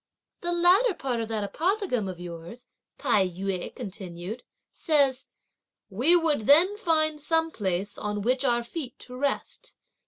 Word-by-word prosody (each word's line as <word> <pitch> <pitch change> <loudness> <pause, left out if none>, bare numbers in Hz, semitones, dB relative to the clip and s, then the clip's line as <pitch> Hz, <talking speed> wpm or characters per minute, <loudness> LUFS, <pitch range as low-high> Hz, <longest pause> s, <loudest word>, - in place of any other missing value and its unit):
"The 345 - -2
latter 360 +6 +4
part 250 -6 -2
of 225 - -3
that 220 -2 -2
apothegm 315 - -1
of 180 -2 -7
yours," 175 +6 -9 0.3
Tai 210 -9 +2
yü 185 0 -4
continued, 195 -1 -7 0.3
"says: 280 -4 +1 0.6
"We 255 - +5
would 310 -10 +1
then 340 +8 +6
find 310 -6 +1
some 325 +1 +1
place 195 - -2
on 210 -1 -3
which 255 +4 +1
our 240 -3 +2
feet 255 0 -6
to 250 - -8
rest. 275 +1 -3
250 Hz, 145 wpm, -26 LUFS, 200-320 Hz, 0.6 s, then